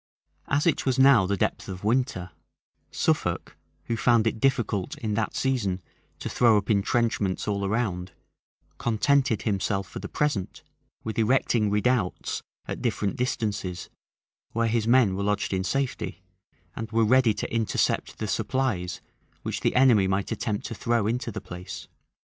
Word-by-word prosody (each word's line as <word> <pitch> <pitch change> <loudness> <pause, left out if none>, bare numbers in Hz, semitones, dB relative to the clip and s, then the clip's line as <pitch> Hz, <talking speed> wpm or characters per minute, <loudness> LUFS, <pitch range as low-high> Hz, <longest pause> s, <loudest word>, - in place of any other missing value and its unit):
As 140 +1 +1
it 170 - +2
was 130 -1 +1
now 130 -8 +6
the 100 +1 0
depth - - -1
of 90 0 -7
winter, 110 -6 0 0.6
Suffolk, - - -1 0.3
who 115 - -2
found 115 -1 +3
it 115 0 0
difficult, 120 -8 0
in 110 -2 -2
that 110 0 -1
season, 115 -9 0 0.4
to - - -5
throw 115 -3 +4
up 105 +2 0
intrenchments 105 -2 +1
all 100 -1 -1
around, 95 -4 -1 0.7
contented 125 +1 +2
himself, 100 -2 -1
for - - -7
the 100 - -7
present, 145 -11 -2 0.4
with 110 0 -3
erecting 115 -2 +2
redoubts 105 -1 0 0.2
at - - -5
different 100 -2 -1
distances, 105 -7 -2 0.6
where 115 0 +1
his 115 -1 0
men 120 -5 +5
were 100 - -3
lodged 100 0 0
in 95 0 0
safety, 120 -5 -2 0.5
and 110 -1 -5
were 115 0 +3
ready 120 -1 +4
to - - -4
intercept 115 -2 0
the 110 - -3
supplies 105 -6 -1 0.4
which - - -3
the - - 0
enemy 120 -7 +5
might 95 +1 -1
attempt 105 -2 -2
to - - -4
throw 115 -1 0
into 120 +2 -1
the - - -6
place. 90 -1 -8
110 Hz, 155 wpm, -26 LUFS, 100-120 Hz, 0.7 s, now